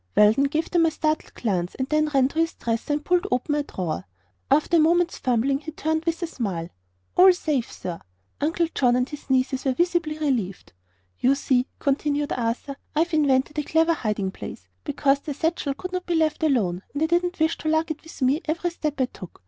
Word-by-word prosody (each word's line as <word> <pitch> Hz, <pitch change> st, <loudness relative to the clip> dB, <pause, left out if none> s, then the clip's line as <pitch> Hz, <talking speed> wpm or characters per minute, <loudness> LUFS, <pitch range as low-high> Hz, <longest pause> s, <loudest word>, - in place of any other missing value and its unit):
Weldon 215 Hz, +6 st, +6 dB
gave 310 Hz, +4 st, -1 dB
them 335 Hz, -2 st, +4 dB
a -, -, +3 dB
startled 310 Hz, 0 st, -2 dB
glance 185 Hz, -6 st, -1 dB
and 260 Hz, -, -2 dB
then 305 Hz, 0 st, +2 dB
ran 270 Hz, -2 st, +4 dB
to 315 Hz, -, -3 dB
his 330 Hz, 0 st, +1 dB
dresser 230 Hz, +5 st, -2 dB
and 295 Hz, +1 st, -2 dB
pulled 360 Hz, +2 st, +2 dB
open 250 Hz, +4 st, 0 dB
a 295 Hz, -, +1 dB
drawer. 170 Hz, -, -4 dB, 0.4 s
After 305 Hz, +3 st, +3 dB
a -, -, +5 dB
moment's 340 Hz, +2 st, +3 dB
fumbling 255 Hz, +2 st, +1 dB
he 315 Hz, +2 st, -7 dB
turned 315 Hz, +1 st, -1 dB
with 335 Hz, +1 st, -1 dB
a -, -, +2 dB
smile. 195 Hz, -, -4 dB, 0.5 s
"All 370 Hz, +1 st, +8 dB
safe, 300 Hz, -8 st, -1 dB
sir." 170 Hz, -2 st, -6 dB, 0.4 s
Uncle 330 Hz, +3 st, +1 dB
John 245 Hz, -2 st, +3 dB
and 250 Hz, 0 st, +1 dB
his 295 Hz, 0 st, -10 dB
nieces 260 Hz, 0 st, +1 dB
were 265 Hz, -, +1 dB
visibly 345 Hz, 0 st, 0 dB
relieved. 240 Hz, -, -2 dB, 0.5 s
"You 265 Hz, +2 st, +4 dB
see," 255 Hz, -2 st, +1 dB
continued 290 Hz, +1 st, 0 dB
Arthur, 245 Hz, +3 st, -2 dB, 0.2 s
"I've 335 Hz, +3 st, +1 dB
invented 290 Hz, 0 st, +2 dB
a -, -, -1 dB
clever 325 Hz, +3 st, +3 dB
hiding 210 Hz, -9 st, -2 dB
place, -, -, -9 dB, 0.2 s
because 280 Hz, -1 st, +2 dB
the 290 Hz, 0 st, -6 dB
satchel 315 Hz, -3 st, -1 dB
could 365 Hz, +5 st, -6 dB
not 365 Hz, 0 st, -4 dB
be 345 Hz, -, +1 dB
left 315 Hz, -1 st, +1 dB
alone 215 Hz, -, +1 dB
and 290 Hz, -, 0 dB
I -, -, +5 dB
didn't 350 Hz, +2 st, 0 dB
wish 320 Hz, +1 st, +1 dB
to 310 Hz, -, -2 dB
lug 315 Hz, +1 st, +1 dB
it 310 Hz, -, -5 dB
with 325 Hz, -4 st, -7 dB
me 275 Hz, +5 st, +2 dB
every 335 Hz, +3 st, -1 dB
step 305 Hz, -4 st, -3 dB
I 260 Hz, -, +4 dB
took. 185 Hz, -7 st, -12 dB
295 Hz, 210 wpm, -24 LUFS, 255-325 Hz, 0.5 s, All